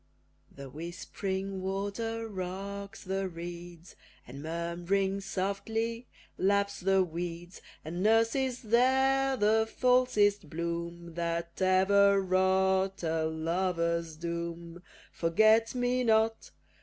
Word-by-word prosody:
The 140 0 -10
whispering 190 +5 -5
water 205 +4 -3
rocks 200 +1 -6
the 190 0 -2
reeds, 170 0 -9 0.3
And, 135 +3 -9
murmuring 175 +5 -1
softly, 225 +5 -3 0.3
laps 200 +1 +1
the 195 0 +3
weeds; 175 +1 -6 0.2
And 170 +3 -4
nurses 230 +4 +2
there 265 +3 +3
the 220 +1 +2
falsest 215 - +2
bloom 170 +1 -4
That 170 +1 -3
ever 195 +2 +4
wrought 190 0 +1
a 160 -1 0
lover's 170 0 -1
doom. 170 +1 -5 0.3
Forget 220 +8 +3
me 250 0 +1
not! 225 -1 +2
190 Hz, 95 wpm, -30 LUFS, 170-215 Hz, 0.3 s, ever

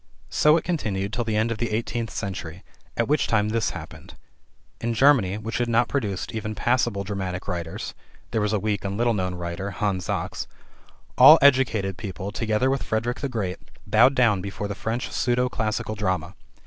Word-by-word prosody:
So 150 +1 +5
it 165 - -2
continued 105 - -2
till 120 - 0
the 110 -1 -2
end 110 +2 +1
of 110 - -3
the 120 - -1
eighteenth 115 +1 -2
century, 90 -4 -5 0.3
at 115 - +1
which 150 +1 +2
time 105 -2 +2
this 115 0 0
happened: - - -10 0.6
In 115 0 -2
Germany, 115 -7 +4
which 110 +3 -4
had 120 -1 0
not 115 +1 +3
produced 105 -10 -2
even 110 -1 -4
passable 120 -3 +1
dramatic 95 -2 -4
writers 85 -3 -4 0.4
(there 110 - 0
was 105 0 0
a 110 - +2
weak 105 -1 -1
and 100 0 -3
little 120 0 +2
known 90 -3 -2
writer, 85 +2 -4
Hans 95 -2 -2
Sachs), - - -3 0.7
all - - +11
educated 115 -9 +3
people, 95 0 -5
together 110 +5 0
with 135 - -1
Frederick 115 +2 -2
the 140 - -2
Great, 100 -7 -3 0.3
bowed 125 +5 +5
down 115 -7 +3
before 100 +1 -5
the 100 - -3
French 115 +4 -3
pseudo 125 +1 +1
classical 110 -2 -2
drama. 95 -5 -2
110 Hz, 185 wpm, -24 LUFS, 95-120 Hz, 0.7 s, all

